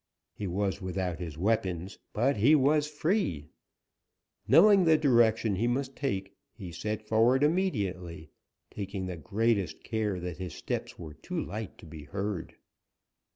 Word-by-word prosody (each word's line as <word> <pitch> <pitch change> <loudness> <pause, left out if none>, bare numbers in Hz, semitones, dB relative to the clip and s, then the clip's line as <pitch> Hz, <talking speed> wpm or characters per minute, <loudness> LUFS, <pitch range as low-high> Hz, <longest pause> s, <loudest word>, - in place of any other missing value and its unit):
He 100 - -5
was 100 +2 -1
without 90 -2 -3
his 80 -4 -6
weapons, 95 -1 -1
but 125 +4 +1
he 130 +10 +6
was 150 +1 +3
free. 150 - -1 1.0
Knowing 200 +1 +7
the 160 -2 +5
direction 115 -7 +3
he 115 +5 +1
must 130 +2 -1
take, 100 -8 -3 0.2
he 95 -6 -8
set 105 +6 -4
forward 115 +5 +4
immediately, 100 - -1 0.4
taking 100 -2 -5
the 90 -1 -4
greatest 100 +2 -1
care 105 -4 -1
that 90 -1 -5
his 90 -1 -6
steps - - -4
were 80 -3 -8
too - - -5
light 110 -2 -5
to - - -14
be 80 -2 -10
heard. 100 +1 -4
105 Hz, 145 wpm, -29 LUFS, 90-130 Hz, 1.0 s, Knowing